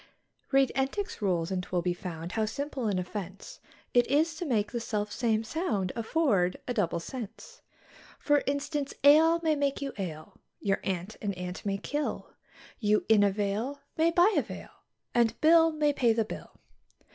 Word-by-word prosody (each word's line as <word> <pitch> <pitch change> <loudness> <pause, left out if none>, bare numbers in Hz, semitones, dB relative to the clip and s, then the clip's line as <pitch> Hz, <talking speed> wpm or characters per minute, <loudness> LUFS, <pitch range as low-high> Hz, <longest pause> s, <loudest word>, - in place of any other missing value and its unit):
Read 270 -1 +4
Entick's 385 - -2
rules, 180 -3 0
and 185 -1 0
'twill 180 -1 -2
be 180 0 +1
found, 175 -2 -6
how 220 - 0
simple 265 +2 -3
an 200 -3 0
offence 190 +1 -6 0.3
It 245 -1 +4
is 305 +4 +2
to 345 - -4
make 215 -5 0
the 240 - -2
self 215 -3 -3
same 225 -3 0
sound 220 - -1
afford 225 - +1
a 245 - -1
double 180 -7 0
sense. 225 +4 -8 0.6
For 290 -1 +2
instance, 285 0 -2
ale 320 +4 +7
may 315 -1 +3
make 280 -1 0
you 280 -1 -4
ail, 155 -5 -6 0.2
your 195 -1 0
aunt 190 +2 -3
an 205 -2 -1
ant 180 0 -6
may 195 0 0
kill, 290 +9 -3 0.5
You 210 -1 +2
in 220 -2 +6
a 205 - +5
vale 210 +7 -2 0.2
may 325 +1 +3
buy 350 +5 +4
a - - +4
veil - - -9 0.4
and 235 -1 +2
Bill 325 +1 +6
may 300 -2 +1
pay 240 -5 +3
the 225 -1 +1
bill. - - -9
225 Hz, 175 wpm, -29 LUFS, 195-285 Hz, 0.6 s, ale